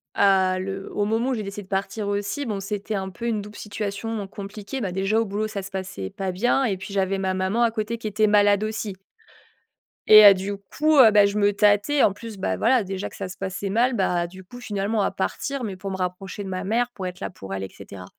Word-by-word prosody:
à 190 -2 +3
le 195 +1 -5
au 205 - 0
moment 225 +4 0
où - - +1
j'ai 225 - -2
décidé 200 +1 -6
de 190 - -19
partir 200 +2 -2
aussi, 205 +8 -2
bon 210 -4 -3
c'était 205 +2 -4
un 190 -1 -3
peu, 230 +5 -8
une 220 -3 0
double 210 +1 -11
situation 210 +1 -4
compliquée. 200 +5 -7
Bah 200 -7 -2
déjà 195 +4 +1
au 225 - +1
boulot, 210 +1 -2
ça 210 -2 -5
se 195 - -9
passait 185 - -5
pas 190 -1 -4
bien 245 +8 +1
et 195 -5 0
puis 190 +2 -8
j'avais 195 0 +1
ma 190 -1 -1
maman 190 +5 0
à 230 - +3
côté 220 +1 -3
qui 225 - -5
était 215 +1 +2
malade 205 0 +4
aussi 215 -1 -3 1.1
et 215 0 +10
heu, 200 - +11
du 195 +1 -4
coup, 300 +10 0
heu 230 -4 +9
bah, 205 -1 +6
je 200 +1 -1
me 205 0 +3
tâtais 210 +8 +3
en - - +5
plus, 220 +1 -9
bah, 190 - -1
voilà, 245 0 +3
déjà 190 0 -4
que - - -14
ça 195 -2 -5
se 185 - -9
passait 195 +1 -4
mal. 240 +6 +2
Bah 175 -3 +1
du 190 +2 -12
coup, 245 +7 -12
finalement, 210 -1 -1
à - - +1
partir, 275 +7 -3
mais 200 -4 -4
pour 195 +1 -5
me 190 - -3
rapprocher 185 +2 -4
de 195 - -6
ma 185 0 -4
mère, 240 +4 0
pour 190 -5 -5
être 180 0 -8
là - - -3
pour 95 - -9
elle, 95 0 -3
et 95 - -5
cetera 95 0 -11
200 Hz, 255 wpm, -24 LUFS, 190-215 Hz, 1.1 s, heu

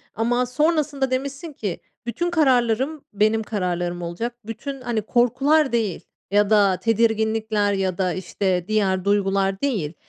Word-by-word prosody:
Ama 245 +3 +1
sonrasında 285 0 0
demişsin 280 +5 -3
ki, 205 -9 -4 0.3
"Bütün 345 +9 -2
kararlarım 265 -1 +2
benim 215 +2 +2
kararlarım 175 -4 -2
olacak. 175 +8 -4
Bütün, 270 +5 -6
hani, 240 -3 -1
korkular 265 +7 +2
değil 220 -7 -1 0.3
ya 205 0 +3
da 200 -3 +4
tedirginlikler 220 -2 +1
ya 190 -2 -1
da, 185 -2 0
işte, 185 0 -1
diğer 195 -4 +1
duygular 195 -1 +1
değil. 205 - -1
220 Hz, 130 wpm, -22 LUFS, 195-255 Hz, 0.3 s, da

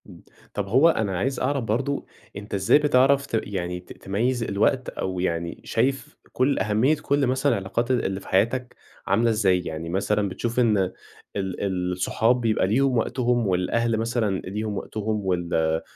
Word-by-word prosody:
إمم. - - -14 0.3
طب 105 -1 -3
هو 130 +11 +5
أنا 105 - 0
عايز 130 +8 -1
أعرف 140 0 0
برضه 130 +6 -1 0.3
أنت 100 +1 -8
إزاي 100 +6 +4
بتعرف 140 -1 +3
ت 115 -5 0
يعني 90 -3 -4
ت 90 - -12
تميّز 115 +5 0
الوقت، 115 +5 +1
أو 95 -1 -4
يعني 85 -2 -2
شايف 130 +2 -1 0.2
كل 135 +2 +1
أهمية 110 +9 +2
كل 140 -2 +1
مثلًا 130 +3 +1
العلاقات 110 +6 -1
اللي 95 -6 0
في - - -14
حياتك 120 +6 0 0.3
عاملة 110 +5 +3
إزاي؟ 100 -5 +3
يعني 80 0 -5
مثلًا 100 +2 0
بتشوف 120 +6 -2
إن 115 -4 +3 0.6
ال 95 -1 -2
الصحاب 110 +7 +1
بيبقى 110 -5 +1
ليهم 130 +4 +2
وقتهم، 120 -1 +1
والأهل 110 +6 +1
مثلًا 110 -4 0
ليهم 105 +2 -3
وقتهم 105 +1 -3
وال 85 -3 0
110 Hz, 160 wpm, -24 LUFS, 95-125 Hz, 0.6 s, هو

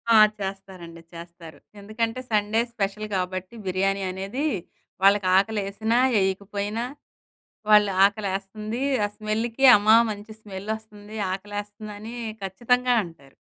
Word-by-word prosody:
ఆ! - - +8 0.2
చేస్తారండి, 190 -4 -7
చేస్తారు. 170 -2 -11 0.2
ఎందుకంటే, 225 +4 -3
సండే 210 +1 +2
స్పెషల్ 210 0 -2
కాబట్టి 185 +3 -3
బిర్యానీ 195 +1 0
అనేది. 195 +10 -4 0.6
వాళ్ళకి 200 -1 +5
ఆకలి 210 +2 +1
యేసినా, 220 +4 -1 0.2
యేయకపోయినా 200 +3 -1 0.8
వాళ్ళు 210 -1 +6
ఆకలి 205 0 0
యేస్తుంది 215 +4 -5 0.2
ఆ - - -1
స్మెల్‌కి, 225 +4 -2
"అమ్మా 215 +2 +5 0.2
మంచి 210 +1 -8
స్మెల్ 200 -1 -8
వస్తుంది, 215 -1 -13 0.2
ఆకలేస్తుందని" 205 +2 -7 0.3
ఖచ్చితంగా 245 +6 +1
అంటారు. 140 -6 -14
205 Hz, 110 wpm, -25 LUFS, 190-215 Hz, 0.8 s, ఆ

